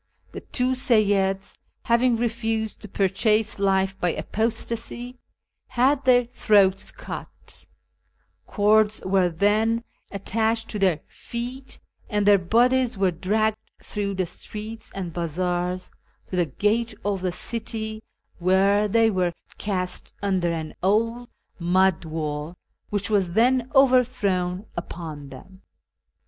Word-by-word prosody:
The - - -7
two 250 0 -1
Seyyids, 205 -7 +2 0.3
having 235 0 +3
refused 225 -2 -2
to 210 - -8
purchase 210 +3 +1
life 195 -1 +1
by 180 - +1
apostacy,^ 230 +2 -3 0.5
had 260 +2 +2
their 245 -1 +5
throats 205 -5 +3
cut; - - -10 0.8
cords 215 +1 +3
were 190 -1 +3
then 215 +6 +2 0.3
attached 225 +3 -1
to 210 - -3
their 180 -5 +2
feet, 250 +3 -7 0.3
and 210 -2 0
their 205 -1 +6
bodies 240 +5 +2
were 190 -1 +2
dragged 215 +5 0 0.3
through 200 -2 -3
the 185 -1 0
streets 215 +5 -7
and 180 -4 -4
bazaars 180 +2 -2 0.3
to - - -6
the 175 -2 +2
gate 215 - 0
of 200 -2 0
the 185 -1 0
city, 220 +2 -4 0.4
where 195 +3 +3
they 225 +2 +3
were 180 -3 0 0.3
cast 185 -3 -3
under 185 -4 +1
an 160 -2 -4
old 230 +5 +1 0.3
mud 180 0 +2
wall, 155 0 -4 0.3
which 205 +1 -2
was 190 -5 +1
then 245 +3 +3
overthrown 230 -8 +3
upon 160 -5 -6
them. 190 +9 -13
205 Hz, 120 wpm, -24 LUFS, 185-230 Hz, 0.8 s, their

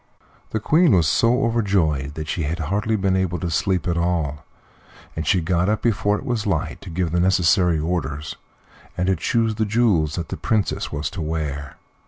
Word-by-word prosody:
The 110 - -2
Queen 155 - +4
was 85 -4 +3
so 120 - +3
overjoyed 90 - 0
that 80 -1 -5
she 85 - -2
had 80 +3 -2
hardly 100 +7 -1
been 95 -2 +1
able 95 -2 0
to 85 +1 -3
sleep 90 +1 0
at 85 -1 0
all, 80 -4 -1 0.7
and 80 -2 -4
she 90 - +3
got 90 +2 +1
up 110 - -1
before 105 -2 +1
it - - -9
was 120 -5 -2
light 80 -6 -2
to - - -9
give 85 -1 -2
the 85 - +1
necessary 90 -1 +3
orders 75 -3 -3 0.6
and 90 - 0
to 95 0 +2
choose 110 +7 0
the 110 +1 -1
jewels 100 -9 +2
that 85 -2 -4
the - - -4
Princess 110 -3 -1
was 75 +3 -3
to 95 -3 -5
wear. 75 -3 -4
90 Hz, 195 wpm, -22 LUFS, 80-105 Hz, 0.7 s, Queen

